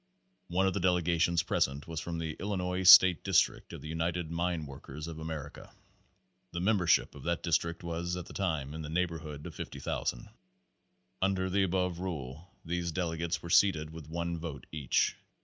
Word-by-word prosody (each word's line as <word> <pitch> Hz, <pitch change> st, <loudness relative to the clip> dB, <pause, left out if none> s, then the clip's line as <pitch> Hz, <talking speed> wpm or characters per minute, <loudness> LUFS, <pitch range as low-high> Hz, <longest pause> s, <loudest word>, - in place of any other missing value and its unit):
One 90 Hz, +2 st, +1 dB
of 95 Hz, -, +2 dB
the 100 Hz, -, -1 dB
delegations 85 Hz, -2 st, +2 dB
present 70 Hz, +2 st, 0 dB
was 80 Hz, -1 st, -4 dB
from 85 Hz, 0 st, -4 dB
the 80 Hz, -2 st, -3 dB
Illi 100 Hz, +2 st, -2 dB
nois 90 Hz, 0 st, +2 dB
State 90 Hz, -4 st, +9 dB
District -, -, +2 dB
of -, -, -8 dB
the -, -, -8 dB
United 80 Hz, +1 st, -2 dB
Mine 85 Hz, -1 st, -1 dB
Workers 70 Hz, +2 st, -8 dB
of 80 Hz, -1 st, -7 dB
America. 80 Hz, -2 st, -7 dB, 0.8 s
The 85 Hz, -, -2 dB
membership 90 Hz, -3 st, +3 dB
of -, -, -11 dB
that 85 Hz, 0 st, -1 dB
district 85 Hz, 0 st, 0 dB
at 85 Hz, +1 st, -3 dB
that -, -, -12 dB
time 80 Hz, -8 st, -1 dB
was 75 Hz, -, -8 dB
in -, -, -5 dB
the 75 Hz, -, -6 dB
neighborhood 80 Hz, -3 st, -3 dB
of 85 Hz, -, -7 dB
50,000. 70 Hz, -4 st, -4 dB, 0.9 s
Under 95 Hz, -1 st, +1 dB
the 100 Hz, +2 st, +2 dB
above 90 Hz, -2 st, 0 dB
rule 80 Hz, -1 st, -6 dB
these 85 Hz, 0 st, -2 dB
delegates 85 Hz, -1 st, -2 dB
were 85 Hz, -, -6 dB
seated 80 Hz, -7 st, +4 dB
with 80 Hz, -2 st, -10 dB
one 85 Hz, 0 st, -3 dB
vote 80 Hz, -5 st, -6 dB
each. 75 Hz, -5 st, +1 dB
85 Hz, 175 wpm, -31 LUFS, 80-90 Hz, 0.9 s, State